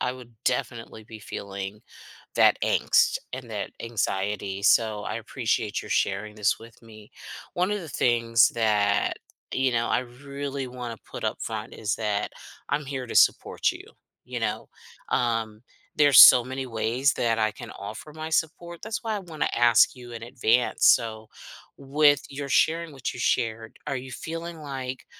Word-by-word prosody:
I 125 - 0
would 125 -2 -13
definitely 115 -3 -3
be 110 0 -11
feeling 100 0 -6 0.6
that - - +5
angst - - +3 0.2
and 125 -2 -6
that 105 -2 -4
anxiety, 100 -3 -2
so 105 0 +3
I - - -4
appreciate - - -2
you're - - -11
sharing 105 +2 -1
this 105 -2 +1
with 115 0 -15
me. 110 -2 -15 0.4
One 180 +3 0
of 210 - -2
the 165 - -9
things 115 -2 +3
that, 105 -3 +1 0.4
you 130 0 +1
know, 115 -1 0
I - - +2
really 140 +2 -6
wanna 125 -2 -7
put - - -8
up - - -2
front - - -5
is 110 0 -2
that 105 -2 -2 0.4
I'm 150 - -1
here 135 -2 -4
to - - -6
support - - +3
you, - - -10 0.4
you - - -5
know? - - -3 0.4
Um, 115 -3 -1 0.3
there's 145 -2 +6
so 125 - +11
many 130 +1 -4
ways 120 +4 +1
that 115 -1 0
I 110 -1 +2
can - - -10
offer 105 +9 -8
my 155 +1 -6
support, 165 +2 -2
that's 220 +2 -4
why 220 -1 -1
I - - -3
wanna 165 -5 -3
ask 120 +1 +5
you 125 -1 -11
in 115 -1 -7
advance, 120 -1 +2
so 110 -2 +3 0.5
with 145 +1 +3
your 140 0 -6
sharing 165 +4 +2
what 135 -3 -4
you - - -9
shared, 110 -1 -1
are 135 - -1
you 130 0 -8
feeling 165 +4 -6
like 130 -3 -6
120 Hz, 165 wpm, -26 LUFS, 110-140 Hz, 0.6 s, so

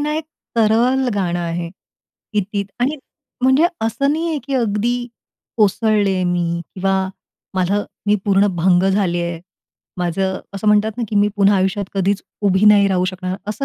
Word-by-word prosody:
ना 300 +1 -1
एक 315 - -3 0.3
तरल 240 +4 +3
गाणं 175 -3 -1
आहे. 170 0 -3 0.6
कितीत 205 -1 -1
आणि 285 +5 +1 0.5
म्हणजे 265 +5 +4 0.2
असं 235 +6 +1
नाही 330 +2 -1
आहे, 315 - -1
की 275 0 -3
अगदी 240 +1 0 0.5
कोसळले 205 -3 +2
मी 170 -1 0
किंवा 195 0 +1 0.6
मला 190 +3 +1 0.2
मी 205 - +4
पूर्ण 200 0 +3
भंग 175 +1 +3
झाले 185 -3 +1
आहे. 170 -1 -4 0.6
माझं 190 +2 -1 0.2
असं 195 +2 -5
म्हणतात 210 +1 +3
ना, 240 - -3
की 210 - -2
मी 205 +1 +4
पुन्हा 200 0 +4
आयुष्यात 195 +2 0
कधीच 195 +1 0 0.3
उभी 190 +2 +2
नाही 200 -1 +6
राहू 185 -1 +1
शकणार, 185 0 -4
असं 215 +6 -3
200 Hz, 160 wpm, -19 LUFS, 185-225 Hz, 0.6 s, नाही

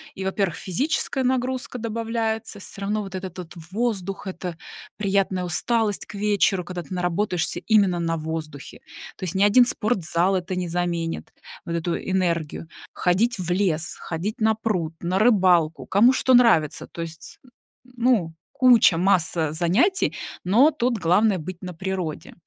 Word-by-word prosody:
И, 190 - -5
во-первых, 190 -3 -1
физическая 265 - -1
нагрузка 255 0 -1
добавляется, 225 -1 -3
всё 195 - -10
равно 210 +2 -1
вот 195 -2 -8
этот 185 -1 -6
вот 175 -3 -8 0.2
воздух, 200 -3 -2
это 180 -2 -6 0.4
приятная 195 -2 0
усталость 210 +4 0
к - - -12
вечеру, 200 -2 +1
когда 175 0 -6
ты 170 - -9
наработаешься 180 0 -1
именно 200 -6 +3
на 165 -1 -1
воздухе. 155 -2 -6 0.4
То - - -10
есть 180 -2 -2
ни 190 - +3
один 220 +5 +6
спортзал 195 -6 0
это 180 +1 -4
не 180 -1 -2
заменит 170 -1 -2 0.3
вот 170 - -4
эту 170 0 -1
энергию. 170 -4 -2 0.3
Ходить 210 +7 +1
в 175 -1 -3
лес, 175 -4 0
ходить 190 +9 -4
на 220 0 +3
пруд, 190 -8 -2
на 180 +2 -1
рыбалку, 185 -8 +3
кому 230 +7 +5
что 260 0 +2
нравится. 225 - +3
То 170 - -8
есть, 165 -1 -9
н 255 - -21 0.5
ну, 230 -9 +2 0.2
куча, 240 -9 +5
масса 170 -4 +1
занятий, 185 - +1 0.3
но 240 - +5
тут 250 -5 -1
главное- 195 +3 +3
быть 175 +3 -8
на 180 -1 -6
природе. 180 -2 -4
190 Hz, 150 wpm, -23 LUFS, 170-220 Hz, 0.5 s, один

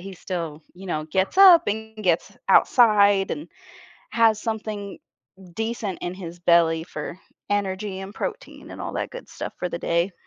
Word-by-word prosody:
he 195 +2 -8
still, 165 -4 -5
you 190 +2 -11
know, 155 -4 -2
gets 190 - 0
up 365 -4 +9
and 220 +1 -4
gets 180 -6 0
outside 205 -5 +5
and 300 - -5 0.6
has 225 -2 +3
something 215 -2 -5 0.6
decent 220 -3 -3
in 175 +1 -3
his 175 -2 -9
belly 170 -2 +3
for 160 +2 -7 0.3
energy 195 -1 -2
and 195 +2 -8
protein - - -6
and - - -8
all - - -5
that - - -3
good - - -10
stuff - - -6
for 180 - -3
the 170 - -5
day. 170 +3 0
195 Hz, 165 wpm, -24 LUFS, 175-220 Hz, 0.6 s, up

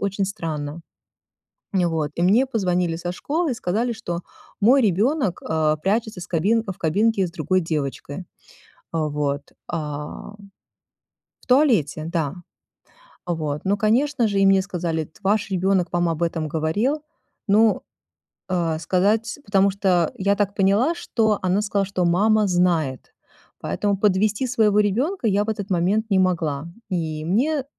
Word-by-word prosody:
очень 200 0 -1
странно. 160 -5 -4 0.9
И 180 -2 +3
вот, 160 -3 -1
и 170 - -2
мне 220 +9 +4
позвонили 180 -8 0
со 175 +1 -4
школы 310 - -1
и 250 - -1
сказали, 225 +5 -1
что 175 -7 -5 0.4
мой 255 +7 +5
ребёнок, 210 - +1
а, 155 -1 +1
прячется 215 +3 -1
с - - -7
кабин 205 +7 +2
в 190 - -6
кабинке 200 +4 +2
с 170 - -9
другой 185 +3 0
девочкой. 150 +1 -4 0.7
А 160 -2 0
вот, 145 -1 -1 0.3
ам 150 +5 -5 1.0
в - - -22
туалете, 230 - +3
да. 165 -2 -2 0.9
Вот, 155 -4 -2
ну, 200 +1 +2
конечно 240 +4 +2
же, 200 -1 0
и 195 - +4
мне 195 0 +5
сказали: 170 -5 -2
"Т 155 - -22
ваш 205 +1 +1
ребенок 185 -1 +1
вам 175 -1 +2
об 165 +1 -1
этом 165 -2 -1
говорил?" 205 - -1 0.4
Ну, 215 +2 +4 0.7
а, 170 -3 0
сказать, 210 - +1
потому 200 0 +3
что 185 -4 +1
я 200 +1 +2
так 200 -1 0
поняла, 205 - +3
что 220 -8 0
она 185 +3 +1
сказала, 200 -2 0
что 185 -2 -1
мама 210 +4 +3
знает, 170 -7 0 0.5
поэтому 205 -1 -1
подвести 210 +4 +1
своего 210 -4 +3
ребёнка 235 - 0
я 205 +1 +2
в 220 - -10
этот 205 -2 -5
момент 195 +5 +1
не 190 - +3
могла. 165 -5 0 0.2
И 160 -3 -2
мне, 265 - +1
190 Hz, 150 wpm, -22 LUFS, 165-215 Hz, 1.0 s, мой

